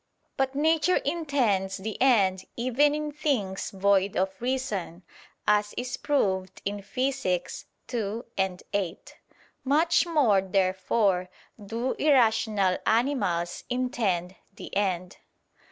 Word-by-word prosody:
But 270 Hz, 0 st, -1 dB
nature 320 Hz, +4 st, +3 dB
intends 260 Hz, -, 0 dB
the 210 Hz, +2 st, -5 dB
end 195 Hz, -8 st, +3 dB
even 255 Hz, +5 st, +2 dB
in 300 Hz, 0 st, -3 dB
things 255 Hz, -11 st, -1 dB
void 195 Hz, 0 st, +2 dB
of 190 Hz, +1 st, +1 dB
reason, 240 Hz, -9 st, -3 dB, 0.4 s
as 210 Hz, 0 st, +2 dB
is 250 Hz, +1 st, -3 dB
proved 190 Hz, -10 st, -1 dB
in 205 Hz, +1 st, -2 dB
Phys. 250 Hz, -3 st, -2 dB, 0.3 s
ii, 205 Hz, -4 st, -2 dB, 0.2 s
8. 195 Hz, -5 st, -3 dB, 0.5 s
Much 325 Hz, +5 st, +3 dB
more, 260 Hz, -, +3 dB
therefore, 190 Hz, 0 st, +1 dB, 0.3 s
do 230 Hz, +5 st, -2 dB
irrational 220 Hz, -9 st, +3 dB
animals 220 Hz, -8 st, 0 dB
intend 220 Hz, -8 st, -1 dB, 0.2 s
the -, -, -9 dB
end. 185 Hz, -3 st, -1 dB
215 Hz, 105 wpm, -27 LUFS, 190-265 Hz, 0.5 s, nature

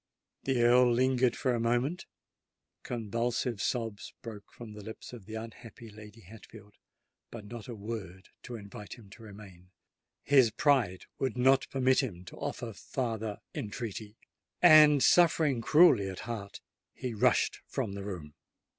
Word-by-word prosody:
The 130 Hz, -3 st, +1 dB
Earl 120 Hz, +1 st, +5 dB
lingered 125 Hz, 0 st, +2 dB
for 130 Hz, -, 0 dB
a 120 Hz, -, -1 dB
moment: 120 Hz, +9 st, -1 dB, 0.7 s
convulsive 115 Hz, 0 st, -2 dB
sobs 115 Hz, -4 st, -3 dB
broke 110 Hz, -4 st, -9 dB
from 115 Hz, -3 st, -11 dB
the 105 Hz, -1 st, -10 dB
lips 110 Hz, +3 st, -10 dB
of 115 Hz, -5 st, -11 dB
the 110 Hz, -, -7 dB
unhappy 115 Hz, 0 st, -10 dB
Lady 105 Hz, +1 st, -13 dB
Hatfield—but 105 Hz, +2 st, -15 dB
not 115 Hz, 0 st, -9 dB
a 120 Hz, -, -6 dB
word 100 Hz, -4 st, -7 dB
to 125 Hz, -, -8 dB
invite 100 Hz, -1 st, -9 dB
him 105 Hz, -5 st, -17 dB
to 115 Hz, -, -14 dB
remain! 100 Hz, -4 st, -13 dB, 0.5 s
His 135 Hz, -5 st, +5 dB
pride 120 Hz, -6 st, +1 dB
would 130 Hz, -3 st, -2 dB
not 135 Hz, +2 st, +3 dB
permit 130 Hz, -1 st, +2 dB
him 90 Hz, -9 st, -3 dB
to -, -, -11 dB
offer 115 Hz, -2 st, -5 dB
farther 110 Hz, 0 st, -4 dB
entreaty;—and, 125 Hz, -, +2 dB
suffering 160 Hz, -7 st, +4 dB
cruelly 150 Hz, -, +5 dB
at 95 Hz, -, -7 dB
heart, 105 Hz, -4 st, -7 dB, 0.3 s
he 125 Hz, -2 st, -5 dB
rushed 105 Hz, -, +2 dB
from 100 Hz, -, -3 dB
the 100 Hz, 0 st, -6 dB
room. 85 Hz, -7 st, -7 dB
115 Hz, 140 wpm, -30 LUFS, 105-125 Hz, 0.7 s, Earl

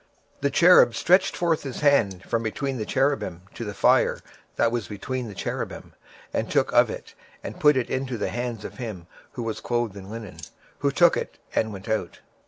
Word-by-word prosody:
26:010:007 -, -, -37 dB
And -, -, -29 dB
one 140 Hz, -, +2 dB
cherub 170 Hz, -10 st, +6 dB
stretched 185 Hz, +7 st, +3 dB
forth 170 Hz, -2 st, +1 dB
his 135 Hz, 0 st, -6 dB
hand 110 Hz, -11 st, +3 dB
from 115 Hz, -, -1 dB
between 130 Hz, +4 st, -3 dB
the 110 Hz, -, -4 dB
cherubims 135 Hz, -10 st, 0 dB
unto 115 Hz, -, -7 dB
the 105 Hz, -2 st, -5 dB
fire -, -, +3 dB, 0.4 s
that 115 Hz, -, +2 dB
was 115 Hz, -6 st, -2 dB
between 125 Hz, +5 st, -4 dB
the 105 Hz, -, -9 dB
cherubims, -, -, -5 dB, 0.4 s
and -, -, -1 dB
took -, -, +2 dB
thereof, -, -, +1 dB, 0.3 s
and -, -, -7 dB
put 150 Hz, -2 st, +5 dB
it 125 Hz, -, 0 dB
into 130 Hz, -2 st, -2 dB
the 105 Hz, -, -2 dB
hands 120 Hz, -3 st, -4 dB
of -, -, -8 dB
him 105 Hz, -8 st, -6 dB, 0.3 s
that 120 Hz, -, -4 dB
was 115 Hz, -1 st, -3 dB
clothed 120 Hz, -4 st, -1 dB
with 100 Hz, -1 st, -10 dB
linen: 105 Hz, -4 st, -8 dB, 0.4 s
who 140 Hz, -, +2 dB
took 170 Hz, +5 st, +5 dB
it, -, -, -4 dB, 0.2 s
and 110 Hz, -, +1 dB
went 100 Hz, +2 st, -9 dB
out. 110 Hz, 0 st, -2 dB
120 Hz, 200 wpm, -25 LUFS, 110-140 Hz, 0.4 s, cherub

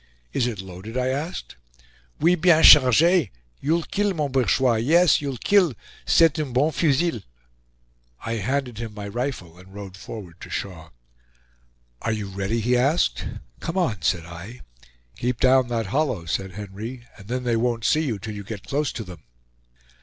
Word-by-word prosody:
"Is 125 Hz, -, +1 dB
it 110 Hz, -5 st, -4 dB
loaded?" 95 Hz, +5 st, -8 dB
I 130 Hz, 0 st, 0 dB
asked. 145 Hz, -, -4 dB, 0.6 s
"Oui, 170 Hz, +3 st, +4 dB
bien 170 Hz, -2 st, +4 dB
charge; 150 Hz, -, +7 dB, 0.3 s
you'll 165 Hz, +4 st, 0 dB
kill, 205 Hz, +1 st, -1 dB
mon 150 Hz, -3 st, -1 dB
bourgeois; 130 Hz, -2 st, +2 dB
yes, 160 Hz, +8 st, +4 dB
you'll 140 Hz, -3 st, -4 dB
kill 180 Hz, -, +3 dB, 0.3 s
c'est 165 Hz, -2 st, +4 dB
un 145 Hz, -5 st, -3 dB
bon 145 Hz, +6 st, +2 dB
fusil." 155 Hz, -, +1 dB, 1.0 s
I 115 Hz, 0 st, -2 dB
handed 125 Hz, +1 st, -2 dB
him 115 Hz, -2 st, -6 dB
my 100 Hz, -1 st, -6 dB
rifle 100 Hz, -7 st, -4 dB
and 95 Hz, +2 st, -16 dB
rode 100 Hz, -2 st, -8 dB
forward 95 Hz, -3 st, -10 dB
to -, -, -9 dB
Shaw. 80 Hz, -5 st, -5 dB, 1.1 s
"Are 115 Hz, -, -1 dB
you 105 Hz, -2 st, -4 dB
ready?" 100 Hz, +4 st, -2 dB
he 125 Hz, +3 st, +2 dB
asked. 125 Hz, -, +1 dB, 0.3 s
"Come 165 Hz, -, -4 dB
on," 115 Hz, -, 0 dB
said 85 Hz, 0 st, 0 dB
I. 90 Hz, +9 st, -10 dB, 0.6 s
"Keep 125 Hz, 0 st, -2 dB
down 130 Hz, -1 st, +4 dB
that 115 Hz, -2 st, -2 dB
hollow," 135 Hz, -, 0 dB
said 95 Hz, +3 st, -3 dB
Henry, 105 Hz, +5 st, -7 dB
"and 100 Hz, -2 st, -14 dB
then 125 Hz, +2 st, -3 dB
they 120 Hz, -2 st, +1 dB
won't 115 Hz, 0 st, 0 dB
see 155 Hz, -, +3 dB
you 120 Hz, -8 st, -2 dB
till 105 Hz, +2 st, -7 dB
you 100 Hz, -1 st, -7 dB
get 100 Hz, -1 st, -7 dB
close 145 Hz, 0 st, -1 dB
to 115 Hz, -, -5 dB
them." 90 Hz, -6 st, -11 dB
120 Hz, 170 wpm, -24 LUFS, 100-145 Hz, 1.1 s, charge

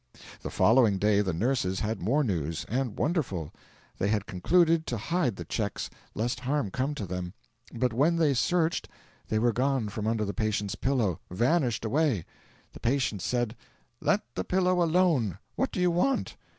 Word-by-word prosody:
The -, -, -5 dB
following 115 Hz, -3 st, +4 dB
day 105 Hz, +1 st, +3 dB
the 95 Hz, -2 st, 0 dB
nurses 95 Hz, -1 st, 0 dB
had 110 Hz, 0 st, -2 dB
more 135 Hz, -, +2 dB
news 80 Hz, -, -2 dB
and 125 Hz, -2 st, -2 dB
wonderful. 125 Hz, -, -1 dB, 0.5 s
They 100 Hz, -, +1 dB
had 105 Hz, -1 st, 0 dB
concluded 165 Hz, -, +2 dB
to 120 Hz, -, -1 dB
hide 140 Hz, -, 0 dB
the -, -, -7 dB
cheques, 105 Hz, -3 st, -3 dB, 0.2 s
lest 120 Hz, +3 st, -1 dB
harm 130 Hz, -4 st, -1 dB
come 135 Hz, +6 st, -1 dB
to 105 Hz, -, -4 dB
them; 90 Hz, +1 st, -5 dB, 0.4 s
but 125 Hz, 0 st, 0 dB
when 150 Hz, +8 st, +3 dB
they 160 Hz, -4 st, +3 dB
searched 165 Hz, +5 st, +1 dB, 0.4 s
they 110 Hz, -, +1 dB
were 120 Hz, +1 st, +2 dB
gone 130 Hz, -2 st, 0 dB
from 105 Hz, +1 st, -4 dB
under 110 Hz, -1 st, +1 dB
the 100 Hz, -, -3 dB
patient's 105 Hz, -3 st, -1 dB
pillow 120 Hz, -, 0 dB
vanished 120 Hz, -, +1 dB
away. 130 Hz, -, +1 dB, 0.5 s
The -, -, -11 dB
patient 120 Hz, -6 st, 0 dB
said: 120 Hz, -2 st, -1 dB, 0.4 s
"Let -, -, +2 dB
the 95 Hz, -, -2 dB
pillow 180 Hz, -, +2 dB
alone; 165 Hz, -, +2 dB, 0.2 s
what 265 Hz, -, 0 dB
do 195 Hz, -, -4 dB
you 180 Hz, -1 st, +3 dB
want?" 220 Hz, +11 st, 0 dB
120 Hz, 170 wpm, -28 LUFS, 105-150 Hz, 0.5 s, following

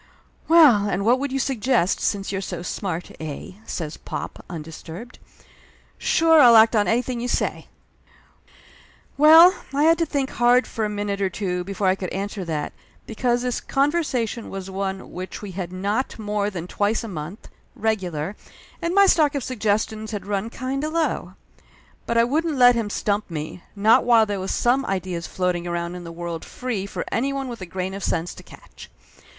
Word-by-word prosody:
"Well, 280 Hz, -12 st, +6 dB
and 195 Hz, +1 st, -1 dB
what 245 Hz, +3 st, +4 dB
would 280 Hz, 0 st, -3 dB
you 270 Hz, -, -1 dB
suggest, 250 Hz, -7 st, +1 dB
since 200 Hz, -2 st, -1 dB
you're 195 Hz, -1 st, -2 dB
so 175 Hz, -3 st, -5 dB
smart, 180 Hz, -2 st, -4 dB
eh?" 155 Hz, 0 st, -6 dB, 0.2 s
says 155 Hz, -3 st, -5 dB
pop, -, -, -7 dB
undisturbed. 165 Hz, +6 st, -9 dB, 0.8 s
"Sure, 325 Hz, -1 st, +4 dB
I'll 240 Hz, -4 st, +8 dB
act 220 Hz, +1 st, +7 dB
on 205 Hz, -1 st, +3 dB
anything 245 Hz, +1 st, 0 dB
you 245 Hz, -, -2 dB
say -, -, -2 dB, 0.8 s
!" -, -, -39 dB, 0.7 s
Well, 325 Hz, +4 st, +9 dB, 0.2 s
I 290 Hz, -, +3 dB
had 330 Hz, +1 st, +5 dB
to 335 Hz, -, +2 dB
think 280 Hz, -2 st, -1 dB
hard 245 Hz, +1 st, +4 dB
for 220 Hz, -, -3 dB
a -, -, -2 dB
minute 205 Hz, -1 st, -3 dB
or 195 Hz, -, +1 dB
two 180 Hz, -2 st, -3 dB
be 200 Hz, -, -5 dB
fore 195 Hz, -, -2 dB
I 185 Hz, -, +5 dB
could 190 Hz, -2 st, -5 dB
answer 195 Hz, 0 st, -4 dB
that, 155 Hz, -3 st, -3 dB, 0.3 s
because 240 Hz, +2 st, 0 dB
this 250 Hz, -1 st, -2 dB
conversation 270 Hz, -6 st, -1 dB
was 195 Hz, 0 st, -6 dB
one 190 Hz, 0 st, -4 dB
which 185 Hz, +3 st, -7 dB
we 200 Hz, -, -6 dB
had 180 Hz, -1 st, -5 dB
not 200 Hz, +7 st, -2 dB
more 210 Hz, -1 st, -1 dB
than 175 Hz, -4 st, -6 dB
twice 205 Hz, +5 st, 0 dB
a -, -, -5 dB
month, 175 Hz, +1 st, -7 dB, 0.3 s
regular, 190 Hz, -5 st, -2 dB, 0.5 s
and 340 Hz, +2 st, -1 dB
my 400 Hz, 0 st, +7 dB
stock 305 Hz, -6 st, +3 dB
of 280 Hz, -, -2 dB
suggestions 220 Hz, -2 st, -1 dB
had 205 Hz, -3 st, -5 dB
run 205 Hz, +2 st, -2 dB
kind 265 Hz, +3 st, -4 dB
of 310 Hz, +1 st, -3 dB
low. 330 Hz, -1 st, -1 dB, 0.7 s
But 235 Hz, -, 0 dB
I 230 Hz, -, +6 dB
wouldn't 305 Hz, +4 st, 0 dB
let 245 Hz, -1 st, +7 dB
him 230 Hz, -3 st, -2 dB
stump 205 Hz, 0 st, -1 dB
me, 155 Hz, +2 st, -6 dB
not 210 Hz, +3 st, +5 dB
while 230 Hz, -2 st, +5 dB
there 205 Hz, -2 st, -3 dB
was 190 Hz, -, -4 dB
some 255 Hz, +3 st, +2 dB
ideas 185 Hz, -3 st, -3 dB
floating 180 Hz, -2 st, -1 dB
around 170 Hz, 0 st, -3 dB
in 180 Hz, -1 st, -8 dB
the 170 Hz, -, -7 dB
world 170 Hz, -1 st, -5 dB
free 225 Hz, -6 st, -4 dB
for -, -, -5 dB
anyone 275 Hz, +2 st, -1 dB
with 235 Hz, -4 st, -7 dB
a 185 Hz, -, -6 dB
grain 185 Hz, +1 st, -4 dB
of 195 Hz, 0 st, -6 dB
sense 165 Hz, +1 st, -1 dB
to -, -, -12 dB
catch. -, -, -14 dB
210 Hz, 190 wpm, -23 LUFS, 185-250 Hz, 0.8 s, Well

